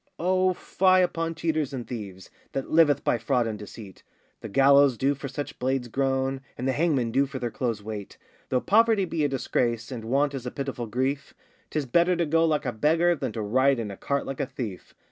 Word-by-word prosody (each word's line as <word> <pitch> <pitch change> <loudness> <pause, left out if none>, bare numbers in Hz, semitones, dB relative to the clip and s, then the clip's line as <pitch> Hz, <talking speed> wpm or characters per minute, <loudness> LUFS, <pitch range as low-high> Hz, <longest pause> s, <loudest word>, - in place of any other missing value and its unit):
O 185 +1 +2
fie 185 0 +3
upon 165 -2 -2
cheaters 155 -4 -1
and 125 -3 -5
thieves, 100 -6 -8 0.2
That 135 - -4
liveth 155 -4 +4
by 120 - +1
fraud 120 +1 +1
and 110 -2 -4
deceit; 105 -2 -11 0.4
The 115 - -8
gallows 140 +2 +5
do 135 +4 +2
for 140 0 -7
such 140 +2 -6
blades 130 -1 -1
groan, 135 +1 0 0.2
And 125 - -3
the - - +3
hangmen 140 -6 +1
do 140 +4 +2
for 135 - -6
their 120 -2 -3
clothes 115 -5 -3
wait. 105 -2 -7 0.3
Though 125 -1 +1
poverty 215 +1 +4
be 165 -3 -2
a - - +1
disgrace, 120 -3 -1
And 115 -3 -6
want 140 +4 +1
is 130 -2 -5
a - - -1
pitiful 135 -3 -5
grief, 130 +5 -2 0.3
'Tis 155 -2 -2
better 170 +8 +3
to 170 0 0
go 165 +2 +3
like 155 -2 0
a 125 - 0
beggar 160 +9 +2
Than 145 - -3
to 110 - -3
ride 130 +6 +3
in 110 -3 -4
a - - -7
cart 140 +6 -2
like 135 -1 -6
a - - -1
thief. 120 -8 -7
135 Hz, 215 wpm, -26 LUFS, 120-155 Hz, 0.4 s, gallows